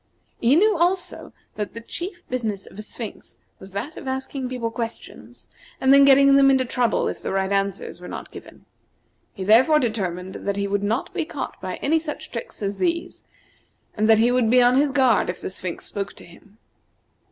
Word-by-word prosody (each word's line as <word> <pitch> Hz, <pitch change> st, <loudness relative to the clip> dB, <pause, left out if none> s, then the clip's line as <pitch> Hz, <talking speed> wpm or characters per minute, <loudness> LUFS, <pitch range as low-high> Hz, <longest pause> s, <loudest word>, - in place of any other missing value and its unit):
He 240 Hz, +4 st, +4 dB
knew, 420 Hz, +5 st, +4 dB
also, 360 Hz, +1 st, -1 dB, 0.3 s
that 210 Hz, 0 st, -4 dB
the -, -, -5 dB
chief 350 Hz, -, -7 dB
business 220 Hz, -6 st, -3 dB
of 205 Hz, -, -13 dB
a -, -, -3 dB
Sphinx 215 Hz, +1 st, -9 dB, 0.2 s
was 190 Hz, +1 st, -12 dB
that 245 Hz, +11 st, -5 dB
of 275 Hz, -, -8 dB
asking 265 Hz, 0 st, -3 dB
people 240 Hz, -3 st, -3 dB
questions, 230 Hz, 0 st, -7 dB, 0.3 s
and 265 Hz, +1 st, +5 dB
then 280 Hz, 0 st, +8 dB
getting 275 Hz, 0 st, +6 dB
them 275 Hz, 0 st, +6 dB
into 265 Hz, -1 st, +3 dB
trouble 240 Hz, -2 st, 0 dB
if -, -, -5 dB
the -, -, -4 dB
right 190 Hz, 0 st, 0 dB
answers 195 Hz, -1 st, -2 dB
were -, -, -8 dB
not -, -, -8 dB
given. -, -, -13 dB, 0.7 s
He 190 Hz, -, -5 dB
therefore 240 Hz, +10 st, +5 dB
determined 190 Hz, -, -2 dB
that 200 Hz, -, 0 dB
he 200 Hz, 0 st, -1 dB
would 200 Hz, 0 st, -1 dB
not 225 Hz, -, -2 dB
be 360 Hz, -3 st, -1 dB
caught 310 Hz, -2 st, -6 dB
by 185 Hz, -1 st, -4 dB
any 320 Hz, +3 st, +3 dB
such 310 Hz, 0 st, -7 dB
tricks 230 Hz, -2 st, -7 dB
as 200 Hz, 0 st, -2 dB
these, 340 Hz, -1 st, -2 dB, 0.7 s
and 215 Hz, 0 st, +1 dB
that 220 Hz, -, +7 dB
he 235 Hz, +3 st, +3 dB
would 245 Hz, -3 st, +2 dB
be 250 Hz, +2 st, +5 dB
on 245 Hz, 0 st, +5 dB
his 285 Hz, +2 st, +3 dB
guard 260 Hz, -8 st, +3 dB
if 180 Hz, -, -4 dB
the -, -, -5 dB
Sphinx 185 Hz, -2 st, -5 dB
spoke 200 Hz, 0 st, -5 dB
to -, -, -14 dB
him. 195 Hz, +5 st, -19 dB
240 Hz, 200 wpm, -23 LUFS, 200-275 Hz, 0.7 s, then